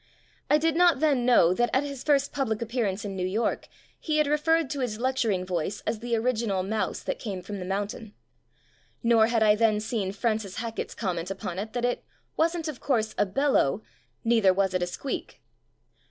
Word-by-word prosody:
I 300 - +6
did 320 +1 +1
not 345 -4 +5
then 275 -5 +2
know 180 -8 +5
that 240 +5 +1
at 265 - +3
his 280 -3 -6
first 280 -2 +2
public 235 -7 -1
appearance 220 -4 -2
in 195 -1 -4
New 185 - -2
York 215 +5 -1 0.3
he 310 -1 -1
had 305 - +4
re 295 +1 +2
ferred 325 0 +2
to 285 - -3
his 240 -5 -2
lecturing 235 -7 0
voice 180 +2 -2
as 220 0 -2
the 235 0 -1
original 225 -5 0
mouse 215 +3 -2
that - - -3
came 195 -5 -5
from 200 +1 -6
the 180 - -5
mountain. 205 +3 -4 0.9
Nor 230 -1 +5
had 230 -1 +2
I 210 -1 +6
then 215 -1 +2
seen 210 -3 -2
Fran 215 +2 0
cis 200 -3 -8
Hackett's 230 -1 -4
comment 180 -4 -3
upon 190 -2 -4
it 220 +2 -5
that 245 -1 -1
"it 245 - -1 0.3
wasn't, 330 0 0
of 300 -5 -5
course, 225 -6 0
a - - +3
beUow. 220 - +1 0.4
Neither 225 -4 +4
was 195 -1 +1
it 185 - 0
a 175 - 0
squeak". 265 +9 -5
225 Hz, 200 wpm, -27 LUFS, 200-265 Hz, 0.9 s, I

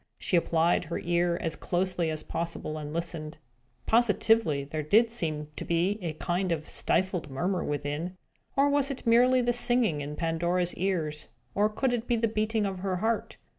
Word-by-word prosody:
She - - 0
applied 170 +1 +2
her 170 - -3
ear 175 0 +1
as 165 -1 -2
closely 180 -2 -1
as 155 -1 -4
possible, 165 -2 -3
and 150 -1 -6
listened. 165 -2 -4 0.5
Positively, 225 -8 +3
there 155 +3 -4
did 220 +10 +4
seem 155 -9 -3
to - - -4
be 175 +5 0
a 165 -3 -3
kind 175 +3 -1
of 155 -2 -2
stifled 185 -4 0
murmur 175 +7 -1
within! 150 +5 -3 0.4
Or 275 +1 +4
was 285 -1 +3
it 270 -2 -6
merely 250 +2 +5
the 240 0 +2
singing 240 - +2
in 145 +1 -5
Pandora's 170 +2 0
ears? 165 -5 -2 0.3
Or 210 +1 +2
could 245 +4 0
it 240 -1 -2
be 240 - +2
the 230 0 +1
beating 215 0 0
of 190 -2 -3
her 190 0 -1
heart? 220 +5 -1
180 Hz, 175 wpm, -28 LUFS, 160-220 Hz, 0.5 s, merely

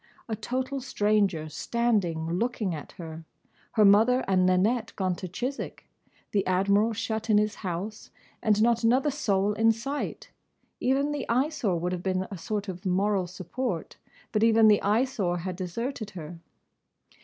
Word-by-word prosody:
A 225 - -2
total 260 +5 -3
stranger 205 - +1
standing 185 -2 0
looking 225 -6 -1
at 150 -3 -8
her; 160 -1 -8 0.5
her 215 -2 +5
mother 225 +6 +5
and 185 -1 +3
Nanette 215 +6 +2
gone 185 -2 0
to 185 - -5
Chiswick; 250 +10 -5 0.4
the 200 -2 +2
Admiral 200 +4 +3
shut 220 +1 -3
in 210 - +5
his 210 0 +2
house; 195 +3 -5 0.3
and 215 -1 +3
not 235 0 +2
another 260 +6 +3
soul 205 -8 +1
in 225 +2 +4
sight. 275 +6 -4 0.5
Even 275 +3 +1
the 290 -3 -4
Eyesore 245 - +1
would 175 +2 -2
have 180 -1 -3
been 185 0 -1
a 195 - -5
sort 205 +2 -3
of 185 -1 -6
moral 190 0 +1
support, 185 +2 -4 0.3
but 210 - +1
even 225 -1 +6
the 210 - +5
Eyesore 210 -4 +1
had 180 +1 -4
deserted 215 +6 -4
her. 165 +1 -8
210 Hz, 155 wpm, -27 LUFS, 185-235 Hz, 0.5 s, even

